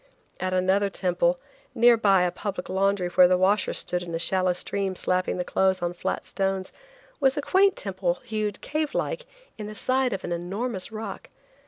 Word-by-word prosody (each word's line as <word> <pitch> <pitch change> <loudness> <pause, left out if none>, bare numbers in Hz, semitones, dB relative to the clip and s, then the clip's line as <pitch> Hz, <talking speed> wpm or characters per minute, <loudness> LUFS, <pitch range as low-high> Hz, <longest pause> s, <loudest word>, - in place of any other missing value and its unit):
At 185 0 -1
another 190 +2 +2
temple, 175 -2 +1 0.4
near 240 0 +6
by 195 -5 +4
a 180 - +1
public 200 -3 -5
laundry 195 -1 +1
where 180 0 +6
the 180 0 +3
washers 190 +2 +2
stood 180 - -2
in 170 -2 -5
a - - 0
shallow 185 +2 +1
stream 190 +1 -2
slapping 185 0 0
the 180 - -1
clothes 190 +1 +1
on 175 0 -1
flat 175 - -3
stones, 195 -1 -2 0.5
was 270 0 +3
a - - +2
quaint 390 +3 +4
temple 185 -3 -1
hewed, 215 -4 -3
cave 305 0 -2
like, - - -2 0.3
in 210 - -5
the 215 - -8
side 255 +3 +1
of 195 - -4
an 175 - -4
enormous 190 +5 -3
rock. 215 -2 -7
190 Hz, 185 wpm, -26 LUFS, 180-215 Hz, 0.5 s, near